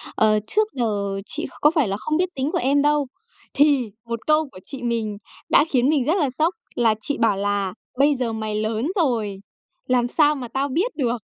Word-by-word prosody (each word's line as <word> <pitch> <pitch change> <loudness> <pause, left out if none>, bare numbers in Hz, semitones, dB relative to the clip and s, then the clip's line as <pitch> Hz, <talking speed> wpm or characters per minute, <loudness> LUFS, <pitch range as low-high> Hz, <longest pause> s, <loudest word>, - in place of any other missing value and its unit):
Ờ, 215 -1 +4
trước 430 - +2
giờ 205 -5 -1
chị 305 - -5 0.2
có 300 - +6
phải 305 -8 +2
là 195 0 -2
không 305 +9 -1
biết 365 +1 +1
tính 270 +3 -1
của - - 0
em 280 +3 +2
đâu." 295 -1 +2 0.5
Thì 275 -6 +3
một 235 0 -3
câu 305 -1 +3
của 185 - -13
chị 270 -3 -8
mình 225 -3 -1 0.3
đã - - +5
khiến 255 -2 +2
mình 290 -5 +2
rất 315 - +2
là 290 -5 +2
sốc 310 +7 0 0.2
là 225 -2 +3
chị 290 - -3
bảo 225 -4 +2
là 200 -1 -1 0.2
"Bây 285 +2 +4
giờ 245 -3 -2
mày 215 -1 -3
lớn 220 +4 -1
rồi, 230 - 0 0.5
làm 245 -1 +2
sao 300 +3 +3
mà 255 -4 -6
tao 265 +4 -1
biết 360 - -1
được?" 245 -4 0
255 Hz, 210 wpm, -22 LUFS, 220-295 Hz, 0.5 s, có